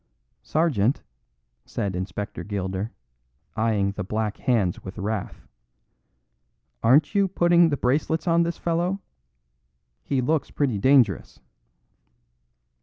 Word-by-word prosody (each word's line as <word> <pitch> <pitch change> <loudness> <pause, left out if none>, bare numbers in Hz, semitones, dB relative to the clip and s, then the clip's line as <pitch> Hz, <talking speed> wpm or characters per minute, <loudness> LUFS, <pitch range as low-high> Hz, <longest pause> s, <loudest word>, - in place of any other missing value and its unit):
"Sergeant," 140 -7 +1 0.6
said 100 -3 -3
Inspector 95 +3 -5
Gilder, 100 +1 -3 0.6
eyeing 110 -3 +1
the 100 0 -5
black 105 +2 -2
hands 105 -9 0
with 95 +2 -9
wrath, 105 -9 -4 1.3
"aren't 145 - +4
you 200 -1 +3
putting 175 -2 +4
the 145 - -1
bracelets 150 +7 0
on 170 0 +4
this 170 0 -1
fellow; 175 +3 -1 1.0
he 135 - -1
looks 150 +4 0
pretty 130 -8 -1
dangerous." 125 - +3
120 Hz, 105 wpm, -24 LUFS, 100-160 Hz, 1.3 s, aren't